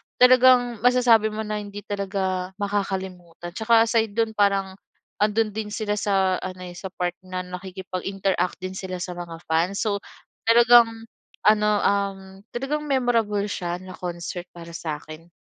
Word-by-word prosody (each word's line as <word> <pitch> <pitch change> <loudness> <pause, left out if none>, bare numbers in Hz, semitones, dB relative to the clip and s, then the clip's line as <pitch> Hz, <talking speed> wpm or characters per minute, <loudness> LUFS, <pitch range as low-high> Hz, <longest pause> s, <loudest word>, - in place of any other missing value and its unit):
talagang 250 -2 +5
masasabi 240 -2 +4
mo 215 0 -4
na 210 0 -3
hindi 205 0 -8
talaga 190 -2 -3
makakalimutan 190 -4 -4
tsaka 225 +4 +4
aside 225 -2 0
do'n 225 -1 +1
parang 195 -2 +1 0.4
ando'n 215 +1 +2
din 220 -1 -3
sila 210 -1 -1
sa 190 -1 +2
ano, 185 0 -6
eh, 180 - -7
sa 190 +2 -6
part 180 -1 -2
na 185 0 -5
nakikipag-interact 185 0 -3
din 185 0 -6
sila 185 -1 -5
sa 180 - -4
mga 170 -2 -7
fans. 170 +5 +1
So 210 -2 0 0.5
talagang 230 -1 +6 0.4
ano, 210 0 +5
um, 200 -1 +1 0.3
talagang 270 +5 -2
memorable 230 -6 +1
siya 175 -3 -3
na 185 0 -10
concert 175 0 -5
para 170 -1 -10
sa'kin. 155 +1 -7
200 Hz, 145 wpm, -24 LUFS, 185-220 Hz, 0.5 s, talagang